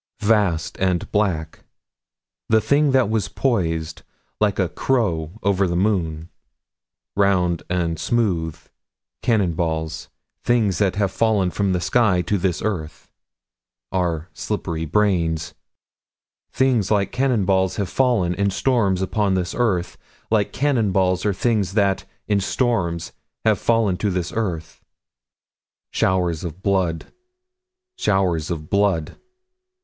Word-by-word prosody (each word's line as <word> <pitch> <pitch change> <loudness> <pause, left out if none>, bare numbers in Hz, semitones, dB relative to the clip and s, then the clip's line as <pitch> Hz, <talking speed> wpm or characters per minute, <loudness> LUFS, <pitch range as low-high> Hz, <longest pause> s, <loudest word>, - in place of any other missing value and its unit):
27 110 +2 +3
Vast 85 -4 -3
and 90 -2 0
black. 90 -7 -1 0.9
The 110 - +5
thing 140 +7 +2
that 130 -3 +3
was 110 -2 0
poised, 80 -10 -1 0.4
like 105 -2 +1
a 95 - +2
crow 85 -6 -1
over 100 -1 +2
the 85 - -2
moon. 85 -5 0 0.9
Round 90 -4 +2
and 85 -3 -1
smooth. 85 -7 0 0.6
Cannon 105 -8 +2
balls. 80 -1 -3 0.3
Things 110 -7 +2
that 95 -3 +2
have 100 -2 0
fallen 105 -5 +1
from 100 0 0
the 90 - +1
sky 95 -2 +2
to 100 +3 0
this 90 -1 -1
earth. 80 -8 -4 0.8
Our 85 -3 -1
slippery 85 -6 -3
brains. 85 -3 +1 1.0
Things 125 -7 +2
like 100 -2 +1
cannon 125 -5 +1
balls 95 -1 +2
have 100 - -1
fallen, 110 -6 +1
in 100 +3 0
storms, 100 -4 +1
upon 100 0 0
this 90 -2 -1
earth. 90 -8 0 0.3
Like 105 -3 +2
cannon 130 -8 +1
balls 95 +1 +1
are 100 - +2
things 105 -3 0
that, 100 -3 +2 0.2
in 105 -1 +2
storms, 95 -7 -1 0.3
have 110 -2 +3
fallen 115 -5 +2
to 105 - 0
this 90 -2 -2
earth. 85 -7 -3 1.1
Showers 90 -4 +1
of 85 +2 -7
blood. 95 -5 0 0.9
Showers 90 -6 +1
of 80 -3 -4
blood. 100 -5 +1
95 Hz, 125 wpm, -22 LUFS, 85-105 Hz, 1.1 s, The